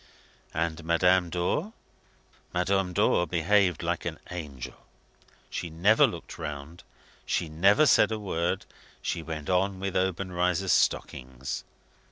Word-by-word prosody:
And 80 0 -1
Madame 90 +2 +3
Dor? 90 - -1 0.8
Madame 95 +1 +1
Dor 90 0 +2
behaved 90 +1 +2
like - - -1
an - - -4
angel. 75 -8 -6 0.8
She 85 - -4
never 95 +8 +4
looked - - -8
round; 75 +2 -6 0.4
she 80 - -1
never 100 - +4
said 140 - +5
a 110 - -1
word; 90 -5 -2 0.4
she 85 - -2
went 80 -2 -6
on 95 +1 +1
with 95 -1 -3
Obenreizer's 90 0 0
stockings. 65 +1 -1
90 Hz, 120 wpm, -28 LUFS, 80-95 Hz, 0.8 s, said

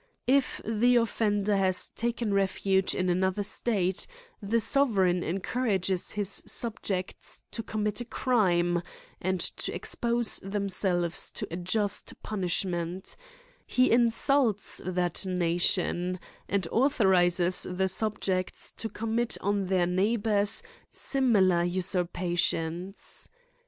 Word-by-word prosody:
If 270 +1 +2
the 230 +3 +3
offender 210 -3 +1
hath 190 -2 +1
taken 235 -2 -2
refuge 195 -1 +1
in 185 - 0
another' 190 +3 +1
state, 195 -3 -1 0.3
the 215 +3 +1
sovereign 205 -7 +2
encourage^ 190 0 -1
his 205 -1 0
subjects 205 -5 -2
tocijm 215 -2 -3
mit 210 +2 -1
a - - -5
crime, 175 -9 +1 0.4
and 185 +1 -1
to - - -1
expose 235 -2 +1
th( 195 +1 -9
mselves 180 -4 0
to - - -4
a - - -3
just 195 +3 -1
punishment; 180 -2 -2 0.5
he 255 0 +3
insults 235 -1 +2
that 180 -1 0
nation, 180 0 +1 0.3
and 195 -3 0
authorises 185 -8 +3
the 185 +1 0
subjects 190 -2 -1
to 225 - -6
commit 225 +2 -1
on 200 -1 -1
their 185 -2 +2
neighbours 205 +2 +1 0.3
similar 200 -10 +2
usurpations. 175 0 -1
195 Hz, 105 wpm, -28 LUFS, 180-220 Hz, 0.5 s, the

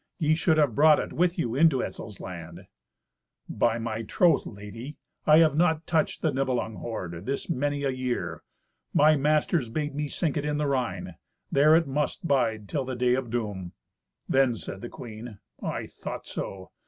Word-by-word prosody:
Ye 155 -3 +2
should 160 0 +2
have 145 -6 +3
brought 150 +4 +6
it - - -3
with 175 +1 +1
you 120 -9 -1
into 140 -1 +4
Etzel's 105 - -7
land." 85 -2 -8 0.8
"By 115 -1 +1
my 115 -1 -3
troth, 160 - +2
lady, 110 +7 -9 0.3
I 155 0 +8
have 160 -3 +5
not 160 -1 +2
touched 160 -2 0
the 160 - +3
Nibelung 130 -5 -1
hoard 90 -4 -6
this 140 +5 -2
many 145 -1 -1
a 135 - +1
year. 130 -1 -3 0.5
My 155 +1 +6
masters 150 -2 +1
bade 145 +4 -2
me 150 +1 -2
sink 155 +1 -1
it 145 - -1
in 150 0 -1
the 150 - 0
Rhine. 100 - -2 0.3
There 150 +3 +6
it 165 0 +4
must 145 +4 -2
bide 115 -7 +1
till 140 +4 -1
the 130 0 -4
day 125 0 +2
of 130 -2 -1
doom." 105 -6 -3 0.5
Then 130 -3 +3
said 95 0 -7
the 120 - -6
queen, 110 -2 -9 0.2
"I - - -3
thought - - -7
so. 95 -1 -6
135 Hz, 180 wpm, -27 LUFS, 115-150 Hz, 0.8 s, I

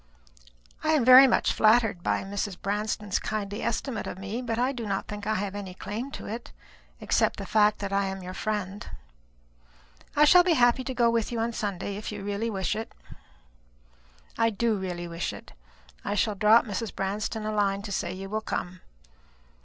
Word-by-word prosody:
"I 315 0 +2
am 285 -7 +3
very 255 +2 +10
much 240 - +2
flattered 220 -4 +3
by - - 0
Mrs. 200 -1 -4
Branston's 210 0 -2
kindly 210 0 -4
estimate 235 0 -2
of - - -6
me, 200 +5 -4
but 230 -2 -3
I 250 +3 +1
do 235 -5 -5
not 195 -1 -2
think 205 -1 -6
I 215 - +1
have 200 0 -2
any 195 -3 -7
claim 225 +8 -5
to - - -7
it, 230 +3 -6 0.5
except - - +1
the - - -5
fact 210 -1 +3
that 200 -1 -4
I 200 0 +2
am 190 -1 -5
your 180 +1 -6
friend. 205 +2 -4 1.3
I 300 - +6
shall 355 +4 +7
be 350 -1 +3
happy 245 -2 +3
to 260 - -4
go 235 -1 +3
with 230 -1 0
you 235 - -3
on 230 +1 -1
Sunday, 200 -2 -3
if 210 - -5
you 205 -1 -6
really 205 +3 -2
wish 190 -4 -1
it." 225 +1 -6 1.5
"I 230 0 +4
do 225 +1 0
really 180 -3 -4
wish 170 0 -3
it. - - -12 0.5
I - - -2
shall 210 0 +1
drop 215 +4 +5
Mrs. 215 +1 -4
Branston 210 +2 -3
a 215 - -1
line 200 -1 0
to 205 - -6
say 175 -2 -2
you 190 +1 -6
will 215 +2 -2
come. 185 -4 -4
210 Hz, 190 wpm, -27 LUFS, 195-230 Hz, 1.5 s, very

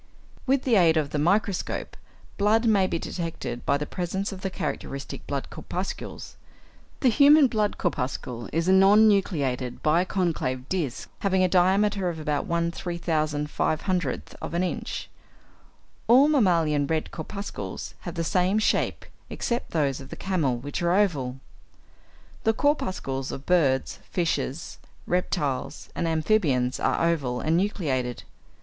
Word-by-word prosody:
= - - -26
With 270 0 +2
the 240 -5 +3
aid 165 -3 +5
of 150 -2 0
the 150 - -1
microscope, 195 +4 0 0.4
blood 215 +3 +3
may 200 -4 +4
be 170 - -1
detected 165 -9 -5
by 140 +2 +3
the 150 - -3
presence 190 +4 -3
of 190 -1 -8
the 190 - -2
characteristic 140 -6 -5
blood 140 -1 -3
corpuscles. 185 +2 -6 0.6
The 260 - +5
human 285 +5 +7
blood 215 -4 0
corpuscle 125 -7 -3
is 165 +2 0
a - - +5
non 200 +3 +7
nucleated, 140 - 0
biconcave 160 -6 0
disc, 160 -9 -2
having 190 -2 +2
a - - +4
diameter 190 +1 +2
of 165 -2 -5
about 150 -2 -2
1/3500 170 -1 -1
of - - -5
an 175 - +1
inch. 185 - -3 1.0
All 260 +5 +7
mammalian 165 - +3
red 160 0 -1
corpuscles 200 +5 -6
have - - -7
the 165 - -1
same 185 +3 +2
shape, 215 - +1 0.2
except 235 0 -2
those 140 -5 0
of 135 - -11
the - - -7
camel, 160 -10 0
which 140 +6 -5
are 175 +1 +2
oval. 140 -11 +1 1.0
The 225 - +3
corpuscles 185 - -1
of 135 - -7
birds, 140 -8 +2
fishes, 170 - -2 0.3
reptiles, 150 -7 -2
and 170 - -2
amphibians, 155 -7 +1
are - - +1
oval 135 -7 0
and 160 +1 +1
nucleated. 145 - -1
170 Hz, 140 wpm, -26 LUFS, 145-195 Hz, 1.0 s, human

